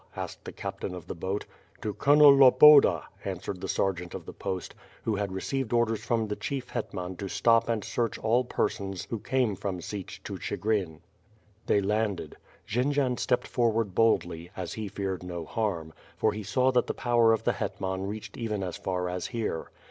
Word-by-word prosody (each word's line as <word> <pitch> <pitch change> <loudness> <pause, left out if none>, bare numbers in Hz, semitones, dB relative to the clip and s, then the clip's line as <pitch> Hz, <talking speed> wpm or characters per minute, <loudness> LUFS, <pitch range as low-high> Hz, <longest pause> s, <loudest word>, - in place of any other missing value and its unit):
asked - - -6
the - - -6
captain 90 - -5
of 90 - -9
the - - -5
boat. 95 +5 -3 0.4
"To 105 - -2
(blonel 145 +2 +7
Lol)oda,'' 135 - +8 0.2
answered 90 -2 -5
the - - -3
sergeant 90 -3 -1
of - - -7
the - - -8
post, 95 -1 -4 0.3
who 110 - 0
had 100 -1 -2
received 120 +6 -2
orders 120 -2 +1
from 115 -2 +1
the 105 - -2
(.hief 135 -2 -3
Hetman 95 -6 -4
to 100 - -4
stop 115 +3 +3
and 110 -3 0
search 115 +3 -1
all 120 +3 +2
persons 100 -6 -2
who 115 - -2
came 125 -3 0
from 95 -1 -4
Sich 95 +2 -6
to - - -6
Chigrin. 95 -7 -2 0.7
They 100 - +3
landed. 100 -5 -1 0.3
Jendzian 130 +2 +1
stepped 125 - +1
forward 115 -4 +1
boldly, 85 -6 +1
as 90 -3 -4
he 110 -1 -4
feared 95 -2 -3
no 90 -2 -5
harm, 85 -6 -2 0.2
for 110 - +2
he 105 - -5
saw 130 +5 +2
that 125 -1 +2
the - - -2
power 120 -2 +3
of 110 0 +1
the 120 - +2
hetman 95 -1 -3
reached 110 +6 -7
even 105 -5 -2
as 90 -2 -4
far 90 -1 -2
as 90 0 -3
here. 115 -9 -3
105 Hz, 185 wpm, -28 LUFS, 95-120 Hz, 0.7 s, Lol)oda